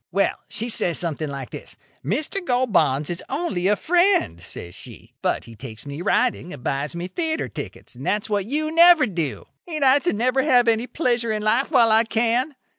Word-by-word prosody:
Well, 195 Hz, +2 st, +2 dB, 0.2 s
she 230 Hz, -, -3 dB
says 175 Hz, -6 st, +2 dB
something 155 Hz, -3 st, -1 dB
like 135 Hz, -2 st, -7 dB
this: -, -, -10 dB, 0.3 s
'Mr. 360 Hz, +6 st, -2 dB
Gold 250 Hz, -, 0 dB
Bonds 145 Hz, -3 st, +2 dB
is 175 Hz, -, -5 dB
only 265 Hz, -, -1 dB
a 210 Hz, -, +4 dB
friend,' 345 Hz, -, +2 dB
says 85 Hz, 0 st, -9 dB
she; -, -, -8 dB
'but -, -, 0 dB
he 115 Hz, -, -12 dB
takes 110 Hz, 0 st, -8 dB
me 140 Hz, +3 st, -6 dB
riding 220 Hz, -3 st, 0 dB
and 135 Hz, -7 st, -10 dB
buys 140 Hz, +6 st, -2 dB
me 175 Hz, +1 st, -4 dB
theatre 320 Hz, -, -2 dB
tickets, -, -, -8 dB
and -, -, -11 dB
that's 210 Hz, 0 st, -1 dB
what 205 Hz, -2 st, -1 dB
you 310 Hz, +4 st, -1 dB
never 335 Hz, -2 st, +7 dB
do. 170 Hz, -, -3 dB, 0.2 s
Ain't 310 Hz, -4 st, -3 dB
I 265 Hz, +1 st, +6 dB
to 350 Hz, -, 0 dB
never 250 Hz, +5 st, +1 dB
have 250 Hz, -4 st, +3 dB
any 230 Hz, +2 st, +2 dB
pleasure 240 Hz, -7 st, 0 dB
in 215 Hz, -1 st, -2 dB
life 230 Hz, +6 st, +2 dB
while 240 Hz, -7 st, +4 dB
I 220 Hz, +1 st, +5 dB
can? 240 Hz, +6 st, 0 dB
225 Hz, 200 wpm, -22 LUFS, 170-275 Hz, 0.3 s, never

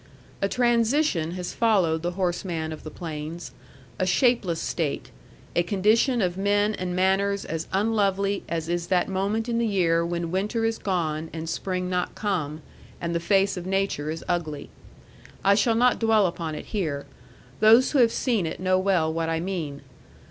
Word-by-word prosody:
A 195 Hz, -, +1 dB
transition 235 Hz, -, +2 dB
has 180 Hz, -1 st, -5 dB
followed 185 Hz, -9 st, +2 dB
the 175 Hz, +1 st, -2 dB
horseman 175 Hz, -3 st, -2 dB
of 155 Hz, -, -9 dB
the 155 Hz, -, -8 dB
plains; 160 Hz, +1 st, -6 dB, 0.5 s
a -, -, +2 dB
shapeless 190 Hz, -4 st, +2 dB
state, 155 Hz, -5 st, -3 dB, 0.4 s
a -, -, +4 dB
condition 215 Hz, +6 st, +2 dB
of 180 Hz, 0 st, -1 dB
men 205 Hz, +2 st, +2 dB
and 180 Hz, -3 st, -3 dB
manners 195 Hz, +2 st, +1 dB
as 160 Hz, 0 st, -4 dB
unlovely 200 Hz, -1 st, +1 dB
as 165 Hz, -1 st, -2 dB
is 175 Hz, 0 st, -2 dB
that 180 Hz, -1 st, +2 dB
moment 200 Hz, +4 st, -1 dB
in 235 Hz, -1 st, 0 dB
the 235 Hz, -, +1 dB
year 170 Hz, -5 st, +2 dB
when 170 Hz, -1 st, -3 dB
winter 210 Hz, +5 st, 0 dB
is 225 Hz, 0 st, -1 dB
gone 160 Hz, -4 st, -2 dB
and 160 Hz, 0 st, -5 dB
spring 180 Hz, +2 st, -2 dB
not 180 Hz, -1 st, -2 dB
come, 160 Hz, -7 st, -2 dB, 0.4 s
and 170 Hz, 0 st, -3 dB
the 170 Hz, -, +1 dB
face 195 Hz, +2 st, +2 dB
of 180 Hz, 0 st, -5 dB
Nature 195 Hz, -6 st, -1 dB
is 160 Hz, +1 st, -4 dB
ugly. 155 Hz, -5 st, -3 dB, 0.7 s
I 200 Hz, -, +5 dB
shall 220 Hz, +3 st, +3 dB
not 245 Hz, +2 st, +3 dB
dwell 225 Hz, -3 st, +4 dB
upon 165 Hz, -3 st, -3 dB
it -, -, -7 dB
here. 155 Hz, -9 st, -2 dB, 0.5 s
Those 225 Hz, +4 st, +6 dB
who 285 Hz, -, +2 dB
have 235 Hz, -2 st, +5 dB
seen 225 Hz, -10 st, 0 dB
it 160 Hz, -, -5 dB
know 185 Hz, 0 st, +2 dB
well 180 Hz, -5 st, +1 dB
what 165 Hz, 0 st, -1 dB
I 165 Hz, 0 st, 0 dB
mean. 165 Hz, -6 st, -4 dB
185 Hz, 175 wpm, -25 LUFS, 165-205 Hz, 0.7 s, Those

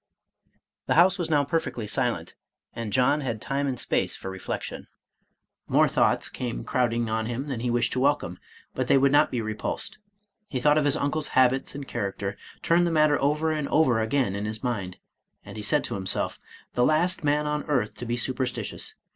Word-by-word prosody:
The -, -, +2 dB
house 180 Hz, +3 st, +5 dB
was 170 Hz, -, -1 dB
now 145 Hz, -2 st, +3 dB
perfectly 140 Hz, -6 st, -2 dB
silent, -, -, -1 dB, 0.4 s
and 115 Hz, -3 st, -5 dB
John 135 Hz, +5 st, +3 dB
had 115 Hz, -5 st, -3 dB
time 140 Hz, +5 st, -2 dB
and 130 Hz, -3 st, -2 dB
space -, -, 0 dB
for 95 Hz, -, -6 dB
reflection. 95 Hz, -, -5 dB, 0.8 s
More -, -, +4 dB
thoughts -, -, +2 dB
came -, -, -5 dB
crowding 120 Hz, -2 st, 0 dB
on 110 Hz, 0 st, -1 dB
him 120 Hz, +3 st, -3 dB
than 135 Hz, -5 st, -3 dB
he 120 Hz, +1 st, -2 dB
wished 120 Hz, -1 st, +1 dB
to 130 Hz, -, -1 dB
welcome, 130 Hz, -10 st, +1 dB, 0.3 s
but -, -, -2 dB
they -, -, +5 dB
would 135 Hz, 0 st, +4 dB
not 145 Hz, -, +5 dB
be 120 Hz, -, -2 dB
repulsed. 110 Hz, -, -3 dB, 0.5 s
He 130 Hz, -, -3 dB
thought 150 Hz, +3 st, +4 dB
of 150 Hz, -, 0 dB
his 145 Hz, +1 st, +3 dB
uncle's 145 Hz, 0 st, 0 dB
habits 130 Hz, +1 st, +3 dB
and 140 Hz, -1 st, -6 dB
character, 100 Hz, 0 st, -3 dB, 0.3 s
turned 175 Hz, +1 st, +3 dB
the -, -, 0 dB
matter 155 Hz, -2 st, +3 dB
over 150 Hz, +3 st, +1 dB
and 150 Hz, -2 st, -1 dB
over 125 Hz, -8 st, +3 dB
again 110 Hz, -2 st, 0 dB
in 100 Hz, +1 st, -3 dB
his 110 Hz, +2 st, -5 dB
mind, 100 Hz, -8 st, -3 dB, 0.5 s
and -, -, -10 dB
he 110 Hz, -, -5 dB
said 145 Hz, +8 st, +1 dB
to -, -, -4 dB
himself, 95 Hz, -1 st, -1 dB, 0.3 s
"The 125 Hz, -, +2 dB
last 170 Hz, +6 st, +2 dB
man 150 Hz, +1 st, +2 dB
on 150 Hz, 0 st, -1 dB
earth 130 Hz, -8 st, 0 dB
to 120 Hz, -, -5 dB
be 120 Hz, +1 st, -1 dB
super 130 Hz, +2 st, -1 dB
stitious. 125 Hz, -, -5 dB
130 Hz, 195 wpm, -26 LUFS, 115-150 Hz, 0.8 s, house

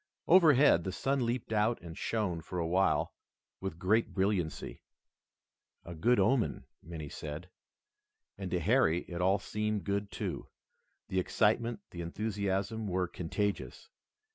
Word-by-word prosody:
Overhead, 150 Hz, -, +6 dB
the 95 Hz, -, -3 dB
sun 135 Hz, +4 st, 0 dB
leaped 120 Hz, -1 st, -2 dB
out 110 Hz, +2 st, +2 dB
and 85 Hz, -1 st, -9 dB
shone 95 Hz, -4 st, -1 dB
for 90 Hz, -, -6 dB
a 85 Hz, -, 0 dB
while 95 Hz, +4 st, +2 dB, 0.5 s
with 95 Hz, -4 st, -5 dB
great 105 Hz, +6 st, +1 dB
brilliancy. 95 Hz, -4 st, -1 dB, 1.0 s
"A 85 Hz, -, -7 dB
good 115 Hz, +9 st, +2 dB
omen," 110 Hz, +5 st, +1 dB, 0.2 s
many 80 Hz, -3 st, -7 dB
said. 75 Hz, +5 st, -7 dB, 0.8 s
And 95 Hz, -2 st, -5 dB
to 90 Hz, -, 0 dB
Harry 90 Hz, -3 st, +3 dB
it 85 Hz, 0 st, -6 dB
all 95 Hz, +2 st, +4 dB
seemed 105 Hz, 0 st, -2 dB
good, 100 Hz, 0 st, -1 dB
too. -, -, -4 dB, 0.6 s
The 95 Hz, -, +1 dB
excitement, 110 Hz, +4 st, +1 dB
the 85 Hz, -, -6 dB
enthusiasm 100 Hz, +3 st, -2 dB
were 90 Hz, -1 st, 0 dB
contagious. 100 Hz, +4 st, -3 dB
100 Hz, 135 wpm, -32 LUFS, 90-110 Hz, 1.0 s, Overhead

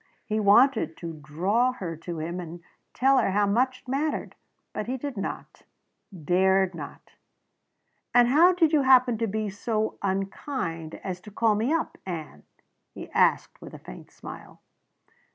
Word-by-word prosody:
He 220 Hz, -2 st, -1 dB
wanted 215 Hz, -, +4 dB
to 165 Hz, -1 st, -6 dB
draw 180 Hz, +12 st, 0 dB
her 175 Hz, -9 st, -5 dB
to 165 Hz, +1 st, -7 dB
him 170 Hz, +3 st, -4 dB
and 170 Hz, 0 st, -8 dB, 0.3 s
tell 270 Hz, +1 st, +3 dB
her -, -, +1 dB
how 205 Hz, +2 st, +2 dB
much 250 Hz, +5 st, +1 dB
it -, -, -32 dB
mattered. 285 Hz, +4 st, -2 dB, 0.4 s
But 215 Hz, -, -4 dB
he 260 Hz, +2 st, -2 dB
did 280 Hz, 0 st, -5 dB
not 195 Hz, -, -6 dB, 0.5 s
dared 190 Hz, +2 st, +2 dB
not. 150 Hz, -4 st, -10 dB, 1.0 s
"And 245 Hz, -1 st, +5 dB
how 330 Hz, +7 st, +6 dB
did 330 Hz, -3 st, +2 dB
you 300 Hz, -, +5 dB
happen 255 Hz, -3 st, +5 dB
to 230 Hz, -, 0 dB
be 215 Hz, +1 st, -2 dB
so 215 Hz, +1 st, -2 dB
unkind 190 Hz, -, -3 dB
as 180 Hz, -2 st, -5 dB
to 210 Hz, -, -12 dB
call 220 Hz, +1 st, +2 dB
me 220 Hz, +6 st, 0 dB
up, 330 Hz, 0 st, -1 dB
Ann?" 165 Hz, -4 st, -6 dB, 0.5 s
he -, -, -9 dB
asked -, -, +1 dB
with -, -, -10 dB
a -, -, -8 dB
faint -, -, -12 dB
smile. -, -, -11 dB
210 Hz, 160 wpm, -26 LUFS, 180-255 Hz, 1.0 s, how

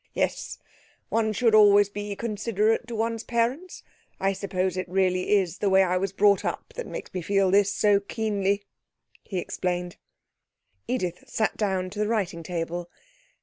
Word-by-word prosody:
Yes; -, -, -2 dB, 0.5 s
one 220 Hz, -1 st, +1 dB
should 230 Hz, +1 st, +2 dB
always 205 Hz, -1 st, +7 dB
be 205 Hz, 0 st, -5 dB
considerate 220 Hz, +1 st, 0 dB
to 235 Hz, -, -5 dB
one's 225 Hz, 0 st, -1 dB
parents. 245 Hz, +10 st, -2 dB, 0.4 s
I 195 Hz, 0 st, +1 dB
suppose 190 Hz, -2 st, -2 dB
it 185 Hz, -1 st, -4 dB
really 185 Hz, +1 st, +2 dB
is 185 Hz, -3 st, 0 dB
the 205 Hz, -, +1 dB
way 190 Hz, 0 st, +5 dB
I 185 Hz, 0 st, +1 dB
was 195 Hz, +1 st, -1 dB
brought 200 Hz, 0 st, +3 dB
up -, -, -4 dB
that -, -, -5 dB
makes -, -, -7 dB
me 185 Hz, -, -3 dB
feel 195 Hz, +1 st, +2 dB
this 200 Hz, 0 st, +4 dB
so 205 Hz, -1 st, +3 dB
keenly,' 200 Hz, -1 st, -1 dB, 0.6 s
he 195 Hz, -, -6 dB
explained. 180 Hz, 0 st, -3 dB, 0.9 s
Edith 180 Hz, -8 st, -2 dB
sat 220 Hz, -, -1 dB
down 190 Hz, -3 st, -1 dB
to 205 Hz, -, -7 dB
the 210 Hz, -, +1 dB
writing 200 Hz, -7 st, -1 dB
table. 170 Hz, +1 st, -4 dB
200 Hz, 160 wpm, -26 LUFS, 185-215 Hz, 0.9 s, always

